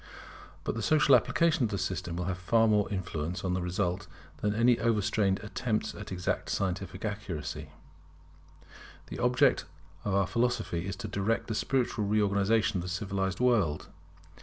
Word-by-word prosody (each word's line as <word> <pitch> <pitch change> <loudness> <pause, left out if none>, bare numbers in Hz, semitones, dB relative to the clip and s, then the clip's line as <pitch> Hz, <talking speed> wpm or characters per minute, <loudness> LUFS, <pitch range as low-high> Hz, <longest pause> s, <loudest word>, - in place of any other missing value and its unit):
But - - -1
the 115 - -4
social 145 +4 +5
application 165 -2 +2
of 115 - +1
the 100 - -2
system 90 -2 -3
will 90 0 -2
have 90 -1 -3
far 115 +5 +3
more 105 -2 +2
influence 90 -3 -3
on 90 - 0
the 90 - -1
result 90 0 -1 0.3
than 105 0 -1
any 120 +1 +4
overstrained 105 -3 +1
attempts 110 0 -2
at 100 -1 -9
exact 90 -1 -2
scientific 95 +1 -2
accuracy. 100 -7 -4 1.4
The - - -5
object 125 0 +3 0.4
of 100 -2 0
our 100 -1 +3
philosophy 110 -6 -1
is 95 - -3
to 115 - -6
direct 100 +3 -1
the 115 - -3
spiritual 120 -2 0
reorganization 105 +1 +2
of - - -1
the 90 - -5
civilized 95 +1 -2
world. 105 -12 +2
100 Hz, 160 wpm, -30 LUFS, 95-115 Hz, 1.4 s, social